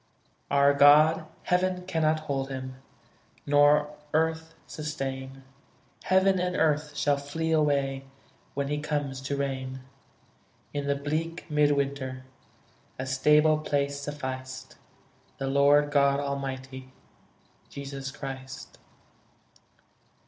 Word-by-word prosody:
Our 140 Hz, 0 st, +4 dB
God, 150 Hz, +3 st, +6 dB, 0.2 s
heaven 180 Hz, 0 st, 0 dB
cannot 160 Hz, -3 st, +1 dB
hold 135 Hz, -3 st, -3 dB
Him, 130 Hz, -1 st, -6 dB, 0.7 s
Nor 145 Hz, +1 st, +4 dB, 0.2 s
earth 160 Hz, 0 st, 0 dB
sustain; 135 Hz, -3 st, -5 dB, 0.6 s
Heaven 190 Hz, 0 st, +3 dB
and 180 Hz, 0 st, -1 dB
earth 150 Hz, -1 st, +1 dB
shall 145 Hz, -1 st, +2 dB
flee 160 Hz, +3 st, -3 dB
away 140 Hz, -3 st, +1 dB, 0.5 s
When 140 Hz, 0 st, -1 dB
He 150 Hz, 0 st, -1 dB
comes 145 Hz, -3 st, -3 dB
to 140 Hz, +1 st, -3 dB
reign: 130 Hz, -1 st, -3 dB, 0.9 s
In 145 Hz, -1 st, -3 dB
the 140 Hz, -, +2 dB
bleak 155 Hz, +4 st, -3 dB
mid 150 Hz, -1 st, +4 dB
winter 135 Hz, -2 st, -3 dB, 0.7 s
A 130 Hz, -, -4 dB
stable 150 Hz, +4 st, +4 dB
place 140 Hz, -2 st, -1 dB
sufficed 130 Hz, -2 st, -6 dB, 0.6 s
The 135 Hz, -, -3 dB
Lord 140 Hz, +2 st, +4 dB
God 140 Hz, -1 st, +3 dB
Almighty, 135 Hz, -2 st, -5 dB, 0.8 s
Jesus 135 Hz, -1 st, -6 dB
Christ. 135 Hz, -1 st, -8 dB
140 Hz, 105 wpm, -27 LUFS, 135-150 Hz, 0.9 s, God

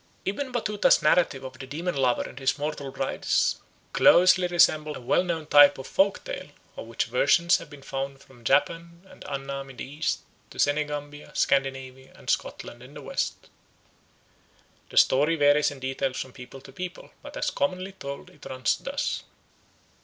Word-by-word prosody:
Ibn 260 Hz, +7 st, -3 dB
Batutah's 210 Hz, -4 st, +2 dB
narrative 150 Hz, -4 st, +3 dB
of 130 Hz, -1 st, -9 dB
the 135 Hz, -, -8 dB
demon 165 Hz, +5 st, -3 dB
lover 130 Hz, -3 st, +2 dB
and 135 Hz, -, -9 dB
his 135 Hz, +1 st, +1 dB
mortal 145 Hz, -1 st, -4 dB
brides 135 Hz, 0 st, 0 dB, 0.3 s
closely 180 Hz, 0 st, +6 dB
resembles 155 Hz, -3 st, +3 dB
a -, -, -10 dB
well 125 Hz, -, +2 dB
known 165 Hz, -3 st, -3 dB
type 145 Hz, -1 st, +7 dB
of 135 Hz, -, -8 dB
folk 195 Hz, +5 st, +1 dB
tale, -, -, -6 dB, 0.3 s
of -, -, -8 dB
which -, -, -1 dB
versions 180 Hz, -, +3 dB
have 165 Hz, -, -11 dB
been 145 Hz, -2 st, -13 dB
found 135 Hz, 0 st, -4 dB
from 125 Hz, -3 st, -19 dB
Japan 170 Hz, +7 st, 0 dB
and -, -, -14 dB
Annam 135 Hz, 0 st, -5 dB
in 130 Hz, -, -13 dB
the -, -, -5 dB
East 145 Hz, +4 st, -2 dB, 0.3 s
to -, -, -14 dB
Senegambia, 145 Hz, 0 st, -1 dB
Scandinavia, 135 Hz, -1 st, -1 dB
and -, -, -3 dB
Scotland 120 Hz, -, -4 dB
in 130 Hz, +4 st, -14 dB
the 145 Hz, -, -8 dB
West. -, -, -3 dB, 1.4 s
The -, -, -9 dB
story 150 Hz, +5 st, +5 dB
varies 145 Hz, -1 st, +4 dB
in 145 Hz, -, -10 dB
details 130 Hz, 0 st, -2 dB
from 130 Hz, -, -6 dB
people 130 Hz, +1 st, -11 dB
to 135 Hz, -, -13 dB
people, 180 Hz, +5 st, -7 dB
but -, -, -9 dB
as -, -, -1 dB
commonly 190 Hz, 0 st, -2 dB
told 140 Hz, -7 st, -8 dB
it 150 Hz, -, -13 dB
runs 130 Hz, -2 st, 0 dB
thus. -, -, -3 dB
145 Hz, 170 wpm, -26 LUFS, 135-170 Hz, 1.4 s, type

